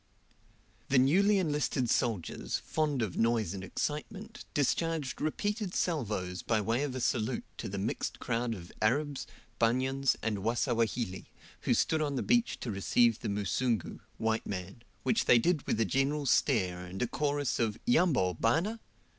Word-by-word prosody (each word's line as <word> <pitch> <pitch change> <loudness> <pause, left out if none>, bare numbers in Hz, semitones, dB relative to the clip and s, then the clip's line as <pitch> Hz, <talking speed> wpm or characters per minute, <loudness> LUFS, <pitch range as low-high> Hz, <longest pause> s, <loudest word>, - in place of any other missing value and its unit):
The 140 - +4
newly 190 +11 +5
enlisted 150 -7 0
soldiers, 115 -7 -1
fond 150 -6 -1
of 100 -5 -4
noise 115 -3 +1
and 95 -1 -6
excitement, 190 - -4
discharged 145 -1 0
repeated 205 +5 -2
salvos 105 - -1
by 110 -2 +1
way 115 +5 0
of 145 -3 -2
a - - -2
salute 120 0 0
to 110 - -5
the 100 - -4
mixed 100 +4 -2
crowd 115 -1 -1
of 90 -3 -10
Arabs, 140 +6 0 0.3
Banyans, 130 +3 +2
and 110 -3 -1
Wasawahili, 115 -2 0 0.3
who - - +1
stood 160 -1 +2
on 145 -2 -1
the - - -1
beach 240 0 +2
to 120 - -3
receive 115 +3 +3
the - - -3
Musungu 105 +4 -1 0.2
(white 110 0 -1
man), 95 +3 -5 0.2
which 225 - +2
they 125 - +7
did 155 +5 +1
with - - 0
a 115 - +3
general 140 +6 0
stare 95 -8 +2
and 90 +1 -7
a - - 0
chorus 145 -1 -1
of 110 -2 0
"Yambo, 170 - +3
bana?" 165 - +1
125 Hz, 155 wpm, -31 LUFS, 110-150 Hz, 0.3 s, they